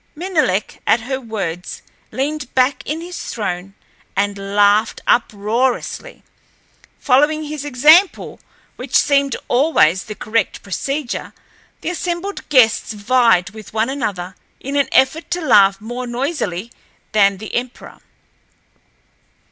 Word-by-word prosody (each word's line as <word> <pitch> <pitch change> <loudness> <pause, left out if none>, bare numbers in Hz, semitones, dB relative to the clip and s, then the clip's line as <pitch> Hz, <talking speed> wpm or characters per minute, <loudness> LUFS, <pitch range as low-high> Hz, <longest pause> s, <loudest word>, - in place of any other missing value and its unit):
Menelek, 305 - -1
at 225 - +4
her 265 +3 -4
words, 190 -7 -5 0.3
leaned 285 0 -3
back 260 +2 +2
in 310 +3 -3
his 350 +1 -7
throne 195 -3 -4 0.4
and 200 +1 0 0.2
laughed 205 +2 +3
uproariously. 235 - -1 0.7
Following 295 +4 +2
his 300 -1 -5
example, 300 +7 +4 0.4
which - - -5
seemed 280 -1 +3
always 245 - +3
the 215 - -7
correct 220 -1 -2
procedure, 275 - -4 0.5
the - - -3
assembled 355 +3 -4
guests 235 -6 +3
vied 210 -3 +2
with 215 -1 -12
one 225 +4 +1
another 195 -9 -4 0.2
in 275 +2 -5
an 280 -1 +2
effort 270 +5 +2
to 355 0 -1
laugh 200 - +4
more 245 +3 -6
noisily 240 - -3 0.4
than 200 -2 +3
the 215 +2 -9
emperor. 245 +1 -5
245 Hz, 115 wpm, -18 LUFS, 205-290 Hz, 0.7 s, at